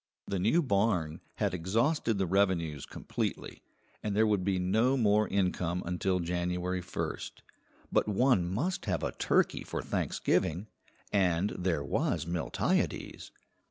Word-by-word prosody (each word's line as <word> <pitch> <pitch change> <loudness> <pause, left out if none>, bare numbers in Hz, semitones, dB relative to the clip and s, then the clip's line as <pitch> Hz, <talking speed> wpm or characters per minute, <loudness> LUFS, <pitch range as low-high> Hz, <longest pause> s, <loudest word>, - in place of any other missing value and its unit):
The 100 - -2
new 115 - +3
barn 100 - +1
had - - 0
exhausted 115 - +1
the 95 - +1
revenues 85 -6 +1
completely, - - -4 0.4
and 105 -2 -2
there 110 +1 +4
would 105 -4 +1
be 95 0 +1
no 110 +9 +2
more 105 -3 +3
income 90 -2 0
until 90 +1 0
January 90 +1 -1
1st; 90 - -4 0.6
but - - +2
one 105 -3 +3
must 160 - -1
have - - -1
a - - -1
turkey - - +1
for - - -4
Thanksgiving, 85 +6 0 0.5
and 95 0 +2
there 90 -5 -1
was 70 - 0
Miltiades. 85 -1 -1
95 Hz, 130 wpm, -31 LUFS, 90-105 Hz, 0.6 s, there